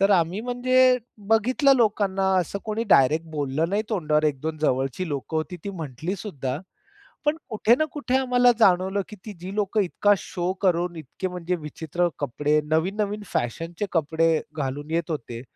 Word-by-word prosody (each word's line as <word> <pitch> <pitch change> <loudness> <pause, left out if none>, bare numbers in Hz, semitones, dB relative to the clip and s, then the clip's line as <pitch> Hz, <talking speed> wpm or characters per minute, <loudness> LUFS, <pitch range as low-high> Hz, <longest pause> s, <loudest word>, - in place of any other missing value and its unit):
तर 195 +1 +4
आम्ही 175 +1 +2
म्हणजे 255 +1 +3 0.3
बघितलं 255 +6 +4
लोकांना 205 -4 +1
असं 185 +2 -1
कोणी 220 +1 -2
डायरेक्ट 155 +4 +5
बोललं 150 +1 -1
नाही 210 +2 +1
तोंडावर, 155 -7 +1
1-2 155 +2 -1
जवळची 135 +4 0
लोकं 145 +2 -3
होती 160 +3 -3
ती 200 - -3
म्हटलीसुद्धा. 155 - -4 0.7
पण 295 +1 +2
कुठे 225 +1 +3
ना 310 - +3
कुठे 270 -3 0
आम्हाला 250 -2 +4
जाणवलं 190 -1 +3
की 210 - -10
ती 215 - -5
जी 185 +2 -6
लोकं 210 +1 +1
इतका 205 +3 +2
शो 180 0 -3
करून, 175 -2 +1
इतके 160 +5 -5
म्हणजे 180 0 -3
विचित्र 160 +2 -2
कपडे, 150 +2 +1
नवीन-नवीन 200 +7 -1
फॅशनचे 165 - -3
कपडे 165 0 +2 0.3
घालून 145 +1 -3
येत 165 0 -1
होते, 120 -5 -5
180 Hz, 155 wpm, -25 LUFS, 155-210 Hz, 0.7 s, डायरेक्ट